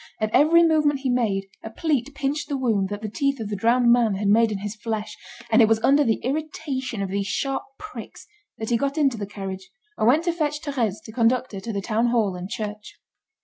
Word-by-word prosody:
At 215 0 -1
every 335 +3 +6
movement 300 -4 +2
he 265 -2 0
made, 210 -6 0 0.2
a 220 - -7
pleat 280 0 -1
pinched 290 +2 -2
the 285 - -1
wound 220 -7 0
that 205 +1 -6
the - - -2
teeth 275 +6 -1
of 215 -2 -4
the 210 - -2
drowned 235 +4 +3
man 235 -4 +3
had 200 +1 0
made 225 +1 +4
in 205 - -2
his 205 +2 -5
flesh, 220 -1 -4 0.4
and 225 - +6
it 220 - +6
was 220 0 +3
under 285 +2 +5
the 225 -5 +1
irritation 265 -5 -3
of 195 - -3
these 200 0 -1
sharp 270 +6 -1 0.2
pricks, 425 0 -10 0.3
that 220 +1 -4
he 235 - +4
got 280 +4 -2
into 275 -6 +2
the 200 - -4
carriage, 190 -2 -7 0.3
and 215 - +3
went 295 +7 +4
to 345 -1 0
fetch 300 -3 -1
Thérèse 245 -10 -2
to - - -10
conduct 245 +3 +1
her 195 - -6
to 225 +4 -5
the 200 -2 -2
town 225 +3 +1
hall 225 -6 +1
and 180 +1 -6
church. 210 0 -6
230 Hz, 230 wpm, -24 LUFS, 210-275 Hz, 0.4 s, every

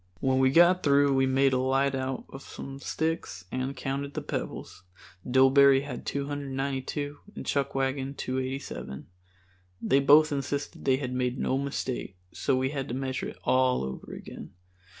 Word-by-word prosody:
When 130 0 +2
we 130 0 +5
got 175 +5 +5
through 140 -1 +4
we 135 0 +3
made 135 0 +3
a 130 - +2
light 135 +1 +2
out 130 -1 -3
of 135 - -9
some 135 -1 -8
sticks 160 - -3
and 130 +1 -3
counted 140 +2 -3
the - - -3
pebbles. - - -5 0.5
Dillbery 135 +1 +6
had 135 -4 -7
292 140 0 -3 0.2
and - - -7
Chuckwagon 135 0 -1
287. 130 - -4 0.7
They 135 - +3
both 150 +3 +6
insisted 140 0 -3
they 130 -1 +4
had 125 -2 -4
made 125 0 -1
no 130 - 0
mistake, 130 -7 -4
so 135 - 0
we 130 +1 0
had 135 -2 -3
to 120 - -4
measure 130 0 -3
it - - -9
all 130 - +2
over 65 -1 -6
again. - - -9
135 Hz, 155 wpm, -28 LUFS, 130-140 Hz, 0.7 s, Dillbery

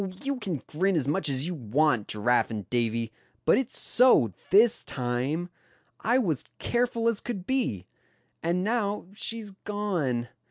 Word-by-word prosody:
you 280 0 -1
can 185 - -4
grin 185 +5 0
as 145 -5 0
much 155 +2 +1
as 135 +1 0
you 180 - -2
want, 125 -3 +1
Giraffe 120 +4 +2
and 105 -5 -5
Davy, 115 -2 0 0.3
but - - +5
it's 265 - -3
so, 235 - +5 0.2
this 220 +3 +5
time. 130 +7 -2 0.5
I 240 +3 +2
was 170 - 0
careful 235 -1 0
as 230 -3 +2
could 200 -7 -5
be. 200 - -1 0.6
And 175 +2 0
now, 210 -1 0
she's 220 0 -4
gone. 185 - -2
175 Hz, 150 wpm, -27 LUFS, -, 0.6 s, but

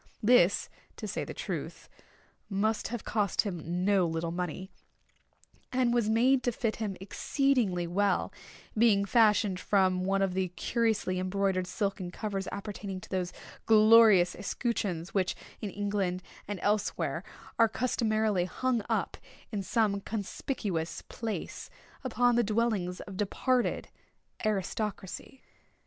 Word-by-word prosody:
This, 210 -5 +5 0.3
to - - -5
say - - -2
the - - -6
truth, - - -5 0.6
must 215 +2 0
have 240 -1 -5
cost 205 -4 +1
him 180 -2 -3
no 195 -3 +4
little 165 0 -2
money, 180 +2 -4 1.0
and 250 -2 +2
was 235 -3 +2
made 250 +4 +4
to 245 - 0
fit 225 -1 -2
him 210 -4 -3
exceedingly 205 -2 +1
well—being 200 +3 0
fashioned 210 -3 +3
from 185 -2 +2
one 195 +1 +1
of 190 -2 0
the 190 0 0
curiously 220 -6 0
embroidered 185 0 0
silken 195 -3 -2
covers 195 0 -4
appertaining 200 -2 -5
to - - -12
those 185 -2 -2 0.4
glorious 215 -4 +7
escutcheons 195 -4 -2
which, 190 -2 +1 0.3
in 210 - -3
England 195 -2 -2 0.2
and 205 -2 -4
elsewhere, 210 0 0 0.4
are 230 -1 +6
customarily 215 -5 +1
hung 245 +5 0
up, - - -1 0.3
in 205 -3 -2
some 200 0 +1
conspicuous 200 - -3
place, 225 -2 -5 0.3
upon 245 -1 +2
the 240 - +4
dwellings 210 -5 0
of 195 -2 -9
departed 245 +5 0 0.6
aristocracy. 210 +3 -3
205 Hz, 125 wpm, -30 LUFS, 185-225 Hz, 1.0 s, glorious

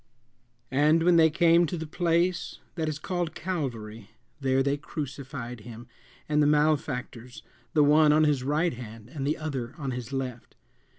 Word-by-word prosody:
"And 150 +4 +3
when 175 0 +5
they 160 -1 +6
came 170 +2 +4
to 175 - -4
the 160 - -4
place 170 +2 0 0.2
that 160 -2 -2
is 150 - -3
called 175 +1 -3
Calvary, 115 - -4 0.3
there 135 -1 +2
they 140 +1 +1
crucified 135 -4 -6
him 115 +2 -10 0.4
and 150 0 +2
the 145 - +4
malefactors, 135 -5 0 0.3
the 150 - +6
one 150 +1 +5
on 155 +1 +4
his 150 -4 +2
right 150 +6 +1
hand 115 -2 -10
and 140 -1 -4
the 150 - 0
other 135 -5 -4
on 140 -5 -3
his 125 0 -6
left. 130 -3 -5
145 Hz, 165 wpm, -27 LUFS, 125-160 Hz, 0.4 s, they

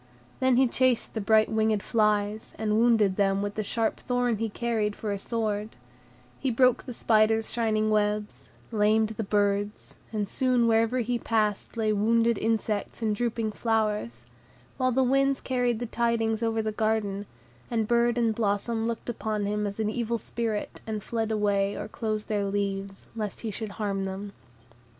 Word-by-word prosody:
Then 260 -2 +3
he 260 0 +5
chased 255 0 +1
the 220 - -2
bright 220 +1 +4
winged 220 -2 +1
flies, 210 -1 0
and 215 -1 0
wounded 220 -5 +3
them 195 0 +2
with 205 0 -3
the 215 - -2
sharp 220 +2 -1
thorn 245 -2 0
he 225 +1 -2
carried 215 -2 -1
for 215 - -4
a 200 - -2
sword; 215 -1 -2 0.6
he 270 - 0
broke 250 +1 +3
the 250 - -6
spider's 220 0 +2
shining 215 -2 +1
webs, 210 0 -1 0.2
lamed 215 0 +3
the 220 0 -4
birds, 205 0 -1
and 210 -2 -1
soon 250 +1 +2
wherever 230 +2 +3
he 240 +1 -1
passed 215 -1 -1
lay 215 -1 +2
wounded 230 +2 +2
insects 220 0 -1
and 215 -1 +1
drooping 230 -1 -1
flowers; 210 - -1 0.5
while 255 0 +2
the 260 +2 +3
winds 275 +1 +2
carried 245 -3 0
the 240 - -3
tidings 230 -1 0
over 225 -1 0
the 215 - -1
garden, 210 -2 -1 0.4
and 225 -3 0
bird 235 0 +2
and 230 -2 +2
blossom 225 +1 0
looked 230 -1 -4
upon 215 -3 -2
him 210 0 -1
as 200 +2 -6
an 215 -1 0
evil 235 0 -1
spirit, 225 -2 -4
and 215 -2 -3
fled 225 -2 -2
away 205 -2 +1
or - - -5
closed 215 -1 -3
their 205 -2 0
leaves, 195 -1 -3
lest 210 -3 -4
he 225 - -3
should 210 0 -5
harm 200 -2 -2
them. 195 +1 -5
220 Hz, 170 wpm, -27 LUFS, 210-230 Hz, 0.6 s, he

